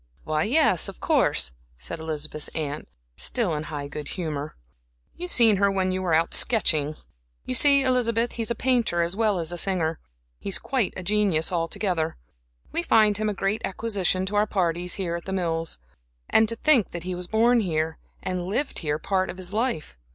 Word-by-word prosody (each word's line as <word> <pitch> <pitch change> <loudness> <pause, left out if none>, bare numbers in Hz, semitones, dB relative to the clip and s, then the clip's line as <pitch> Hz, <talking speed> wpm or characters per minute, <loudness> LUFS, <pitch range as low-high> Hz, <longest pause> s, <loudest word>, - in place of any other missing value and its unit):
"Why, 155 0 0
yes, 240 - +4
of - - -11
course," - - +2 0.3
said 60 - -6
Elizabeth's 155 -1 -4
aunt, 150 -2 -4 0.3
still 225 -9 +1
in 150 - -2
high 145 -2 -5
good 150 0 -7
humor, 155 -5 -4 0.6
"you've 360 +1 -6
seen 225 -4 +5
her 200 +1 +3
when 190 -1 0
you 185 0 -2
were 175 -4 +1
out 165 +1 +1
sketching. 155 -10 +3 0.5
You - - -3
see, 280 - +5
Elizabeth, 240 -2 +1
he's 230 -1 -4
a 235 - 0
painter 235 -9 +1
as 170 +2 -2
well 215 -3 +1
as 165 -1 -2
a 175 - -2
singer; 165 -5 0 0.4
he's 195 - 0
quite 255 -8 -1
a 185 - -5
genius, 195 -5 +1
altogether. 165 - -1 0.5
We - - 0
find 215 -10 +4
him 215 0 -1
a - - -1
great 195 +3 -1
acquisition 195 -3 0
to 200 +2 -4
our 210 +1 +3
parties 175 -2 0
here 175 -3 -2
at 170 - -7
The 190 - -4
Mills. 165 -3 -2 0.5
And 220 -1 +4
to 230 - +1
think 255 -3 +3
that 170 -1 -5
he 185 0 -4
was 180 0 -5
born 235 +3 +3
here, 160 -5 -2 0.2
and 180 -1 -3
lived 265 +9 -2
here 150 -2 -1
part 190 +3 -1
of 180 - -6
his 185 +1 -4
life! 210 - -2
185 Hz, 190 wpm, -25 LUFS, 160-220 Hz, 0.6 s, seen